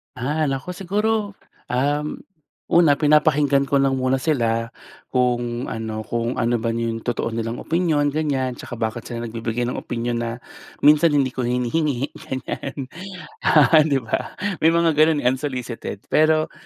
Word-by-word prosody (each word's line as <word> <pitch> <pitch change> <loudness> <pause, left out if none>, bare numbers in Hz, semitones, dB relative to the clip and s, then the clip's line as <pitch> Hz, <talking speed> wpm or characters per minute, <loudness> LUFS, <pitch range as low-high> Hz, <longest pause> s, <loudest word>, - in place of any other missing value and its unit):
Ah, 145 +5 -1
nako 135 +6 -3
siguro, 205 +3 -1 0.3
um, 145 +4 -1 0.5
una 160 -5 +4
pinapakinggan 150 -2 +4
ko 140 0 +1
lang 135 -1 +2
muna 130 0 +1
sila 115 -6 0 0.4
kung 120 -1 -1
ano 110 -1 -4
kung 120 +2 -2
ano 120 0 +1
ba 115 - -3
'yong 115 -1 -2
totoo 115 0 -2
nilang 115 +1 -3
opinyon, 155 -4 +1
ganyan 140 -5 -1
tsaka - - -7
bakit 110 0 -3
sila 120 -1 -5
nagbibigay 115 +1 -3
ng 125 +1 -2
opinyon 120 0 -3
na 115 -1 -2 0.5
minsan 150 +1 +6
hindi 135 -3 +2
ko 125 -1 -2
hinihingi, 125 +3 0 0.2
ganyan, 130 0 -5 1.1
'di 140 -3 +2
ba? 110 - -3 0.2
May 160 - +4
mga 170 -1 +3
gano'n, 155 -2 +4
eh, - - +3
unsolicited. 125 -6 -5
Pero, 155 0 +3
130 Hz, 145 wpm, -22 LUFS, 120-150 Hz, 1.1 s, minsan